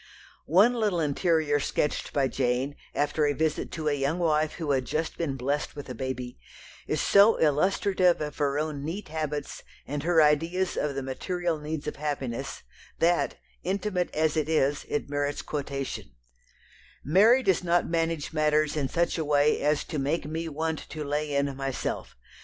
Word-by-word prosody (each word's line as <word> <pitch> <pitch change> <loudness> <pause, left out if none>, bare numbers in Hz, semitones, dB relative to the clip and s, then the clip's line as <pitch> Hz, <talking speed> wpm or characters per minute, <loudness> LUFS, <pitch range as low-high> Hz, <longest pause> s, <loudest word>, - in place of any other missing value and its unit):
One 200 +10 +5
little 210 -7 0
"interior" 155 -1 +1
sketched 150 +1 -1
by 140 -2 +2
Jane, 130 +2 -1 0.2
after 145 +1 +1
a 145 - +1
visit 155 0 -1
to 155 -2 -3
a 150 - +3
young 140 +3 0
wife 155 -3 +1
who 160 -4 -2
had 130 -2 +1
just 155 +5 -2
been 145 -5 -2
blessed 140 +5 -2
with 145 - -7
a - - -3
baby, 125 - -5 0.5
is - - 0
so 200 +3 +6
illustrative 180 +4 +3
of 150 -1 -4
her 140 -1 +1
own 150 -2 -2
neat 175 +4 -5
habits, 150 -2 -4 0.2
and 145 +1 -3
her 165 +1 +3
ideas 165 +5 +2
of 145 -2 -1
the 135 - -2
material 170 +5 -2
needs 150 0 -4
of 150 - -4
happiness, 140 -5 -4 0.3
that, 175 +1 +2 0.3
intimate 190 -1 -1
as 155 0 +2
it 155 -1 0
is, 145 -2 +1
it 145 - -1
merits 145 0 -2
quotation: 140 - -4 0.9
"Mary 215 - +5
does 190 -5 +2
not 175 0 +2
manage 165 -2 -1
matters 155 -1 +2
in 140 -3 -1
such 170 +3 0
a - - 0
way 145 0 +3
as 150 +1 +2
to 155 - -4
make 145 +4 -1
me 160 +2 -3
want 160 +1 -2
to 155 0 -5
lay 145 0 -2
in 140 -1 0
myself. 135 -1 -4
150 Hz, 170 wpm, -27 LUFS, 145-165 Hz, 0.9 s, so